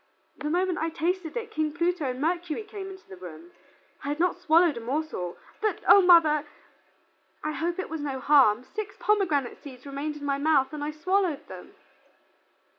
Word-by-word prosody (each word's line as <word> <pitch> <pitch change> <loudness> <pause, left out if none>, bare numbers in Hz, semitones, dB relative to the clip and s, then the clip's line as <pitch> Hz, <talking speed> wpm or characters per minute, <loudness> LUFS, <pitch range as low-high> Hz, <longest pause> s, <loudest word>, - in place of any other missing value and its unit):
The 300 - -4
moment 360 +2 0
I 325 - 0
tasted 340 +3 -2
it 455 -1 -5
King 310 -5 -1
Pluto 345 -1 0
and 250 0 -4
Mercury 345 +4 -1
came 405 -2 -8
into 380 0 -12
the 190 - -11
room. 175 -1 -11 0.5
I - - -5
had 295 +2 -2
not 360 +1 +2
swallowed 335 -1 +4
a - - -3
morsel, 245 - -3 0.2
but 430 -1 -1
O 400 - +9
mother! 330 -5 +6 1.0
I 305 - -1
hope 335 +4 -2
it 375 - -3
was 320 -1 -5
no 275 -2 -3
harm, 255 -5 +5
six 410 +7 -6
pomegranate 325 - +1
seeds 260 -2 -12
remained 285 +2 -4
in 290 - -8
my 280 -1 0
mouth 285 -2 +2
and 300 -1 -4
I 295 - -2
swallowed 325 -1 0
them." 185 -1 -11
310 Hz, 185 wpm, -27 LUFS, 280-360 Hz, 1.0 s, O